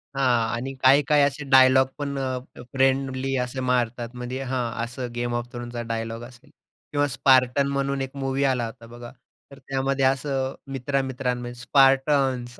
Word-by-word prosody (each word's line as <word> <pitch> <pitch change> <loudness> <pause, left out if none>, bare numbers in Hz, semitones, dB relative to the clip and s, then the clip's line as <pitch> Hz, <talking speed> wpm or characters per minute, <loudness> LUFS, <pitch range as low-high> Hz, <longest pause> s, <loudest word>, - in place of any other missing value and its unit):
हां. 120 -4 +1
आणि 135 +3 -4
काही, 135 +3 +7
काही 150 -1 +4
असे 140 +1 0
डायलॉग 130 0 +6
पण 140 -1 -4
अ, 130 -1 -2 0.3
फ्रेंडली 135 0 +1
असे 125 +1 -6
मारतात, 120 -2 -1
म्हणजे 125 +2 -5
हां, 125 -3 -2
अ, - - 0
असं 120 +1 -5
गेम 120 0 -2
ऑफ 120 0 -4
थ्रोन्सचा 120 0 -6
डायलॉग 115 0 -4
असेल. 125 +4 -14 0.4
किंवा 145 0 +1
स्पार्टन्स 135 0 +3
म्हणून 140 0 -1
एक 135 +1 -5
मूव्ही 135 0 -1
आला 130 -3 +1
होता 115 0 -10
बघा. 120 0 -10 0.4
तर 140 - -13
त्यामध्ये 135 0 -1
असं 135 0 0 0.2
मित्र-मित्रांमध्ये 130 -2 -2
स्पार्टन्स 135 -2 +2
130 Hz, 155 wpm, -24 LUFS, 120-135 Hz, 0.4 s, काही